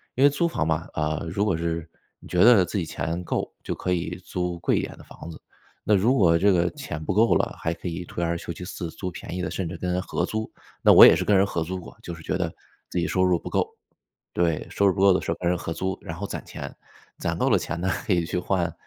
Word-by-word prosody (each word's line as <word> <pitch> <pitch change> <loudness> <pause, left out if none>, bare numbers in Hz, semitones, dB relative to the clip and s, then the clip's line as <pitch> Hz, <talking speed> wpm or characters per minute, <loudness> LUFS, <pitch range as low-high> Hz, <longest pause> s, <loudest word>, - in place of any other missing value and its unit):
因 130 - +2
为 140 - +8
租 160 +4 +1
房 165 - -1
嘛， 80 +1 -1
啊， 75 0 -1
如 100 +5 -1
果 95 -6 +1
是 85 -1 -3 0.3
你 - - -14
觉 90 0 +3
得 115 -5 +7
自 90 +4 -3
己 85 - -1
钱 85 +2 -3
够， - - -2
就 - - -3
可 90 - -3
以 90 -1 -1
租 90 -1 -3
贵 - - +1
一 - - +1
点 - - -6
的 - - -14
房 85 - -10
子。 - - -12 0.4
那 105 - +3
如 110 +7 +3
果 85 -8 +5
这 100 +4 +4
个 90 -1 +2
钱 140 - -6
不 95 - -2
够 115 +2 +5
了， - - 0
还 80 - -2
可 90 - -7
以 90 +1 -4
退 85 - -4
而 85 0 0
求 85 - -6
其 90 - -9
次 85 -2 -6
租 90 +2 -5
便 85 - -8
宜 90 - -3
的， 90 - -2
甚 95 - -3
至 85 - -6
跟 90 +2 -2
人 90 - 0
合 - - -2
租。 110 0 -3 0.3
那 - - +8
我 - - +10
也 - - +10
是 - - -2
跟 105 - +4
人 95 - +5
合 85 -4 -2
租 90 +3 -4
过， 90 - -12
就 85 - -6
是 80 - -10
觉 90 - -2
得 85 -3 -2 0.4
自 90 - -1
己 85 - 0
收 95 - +1
入 90 -2 +3
不 - - -7
够。 - - +1 0.7
对， 85 -3 0
收 100 - +2
入 95 - +3
不 95 - -2
够 100 0 +7
的 90 - +1
时 - - -6
候 - - -1
跟 85 - +1
人 90 - +1
合 80 - -4
租， 95 +2 -2
然 80 - -6
后 100 - -4
攒 - - -6
钱。 - - -7 0.4
攒 - - -2
够 - - +2
了 - - +5
钱 85 - -4
呢， 95 - 0 0.2
可 100 - +2
以 85 -2 +1
去 90 - -3
换 90 -2 -1
90 Hz, 310 characters per minute, -25 LUFS, 85-95 Hz, 0.7 s, 我